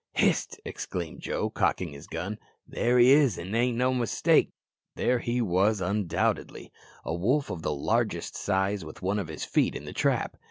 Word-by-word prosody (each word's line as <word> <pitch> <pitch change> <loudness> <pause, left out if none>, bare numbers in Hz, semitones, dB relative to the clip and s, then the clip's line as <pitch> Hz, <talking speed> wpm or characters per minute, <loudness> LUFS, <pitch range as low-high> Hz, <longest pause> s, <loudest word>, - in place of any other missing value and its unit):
"Hist!" - - +1
exclaimed 90 -3 -5
Joe, - - -2
cocking 90 - 0
his 70 +2 -11
gun; 95 +6 -5 0.3
"there 120 +1 +1
he 125 +1 +7
is, 140 -3 +5
an' 90 +3 -6 0.3
no 130 +1 +2
mistake." 120 -4 +2 0.5
There 125 0 +1
he 120 +1 -1
was, 100 +2 +2
undoubtedly. 95 -1 -1 0.3
A - - -2
wolf 125 - +1
of 85 - -5
the 75 - -1
largest 70 -1 -1
size 95 0 0
with 80 +3 -11
one 100 +3 0
of 95 - -4
his 80 0 -5
feet - - +1
in - - -6
the - - -7
trap. - - 0
100 Hz, 170 wpm, -28 LUFS, 85-120 Hz, 0.5 s, he